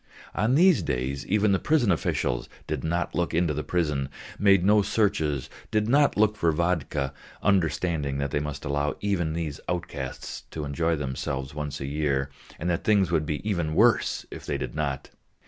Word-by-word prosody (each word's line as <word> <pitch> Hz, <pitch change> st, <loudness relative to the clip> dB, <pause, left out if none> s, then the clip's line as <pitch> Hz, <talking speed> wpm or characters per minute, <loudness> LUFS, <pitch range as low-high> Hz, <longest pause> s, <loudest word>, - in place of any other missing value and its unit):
On 110 Hz, +6 st, +2 dB
these 180 Hz, +2 st, +6 dB
days 65 Hz, +3 st, -2 dB
even 105 Hz, +1 st, +3 dB
the 95 Hz, -, +3 dB
prison 145 Hz, -10 st, +3 dB
officials 60 Hz, -7 st, -1 dB, 0.2 s
did 75 Hz, -4 st, -3 dB
not 85 Hz, +2 st, -1 dB
look 85 Hz, -2 st, -1 dB
into 85 Hz, -2 st, +2 dB
the 75 Hz, -, -2 dB
prison, 75 Hz, -6 st, 0 dB, 0.3 s
made 100 Hz, -3 st, +5 dB
no 105 Hz, +1 st, +6 dB
searches, 95 Hz, -, 0 dB, 0.2 s
did 105 Hz, 0 st, +1 dB
not 140 Hz, +1 st, +4 dB
look 105 Hz, 0 st, +4 dB
for 85 Hz, -5 st, +2 dB
vodka, 75 Hz, -4 st, -1 dB, 0.3 s
understanding 80 Hz, -6 st, +1 dB
that 70 Hz, 0 st, -2 dB
they 75 Hz, -, +1 dB
must 75 Hz, 0 st, -5 dB
allow 70 Hz, 0 st, 0 dB
even 85 Hz, -6 st, 0 dB
these 80 Hz, -3 st, -3 dB
outcasts 90 Hz, -1 st, -4 dB
to 75 Hz, -2 st, -5 dB
enjoy 80 Hz, +4 st, 0 dB
themselves 65 Hz, -1 st, -3 dB
once 75 Hz, -1 st, -4 dB
a 70 Hz, -, -4 dB
year, 70 Hz, -1 st, -1 dB, 0.3 s
and 85 Hz, -, -4 dB
that 85 Hz, -1 st, 0 dB
things 100 Hz, -5 st, +3 dB
would 80 Hz, -3 st, +1 dB
be 75 Hz, +6 st, -3 dB
even 85 Hz, -7 st, 0 dB
worse -, -, +3 dB
if -, -, -8 dB
they -, -, -2 dB
did -, -, -4 dB
not. 70 Hz, -3 st, -3 dB
80 Hz, 180 wpm, -26 LUFS, 70-100 Hz, 0.3 s, these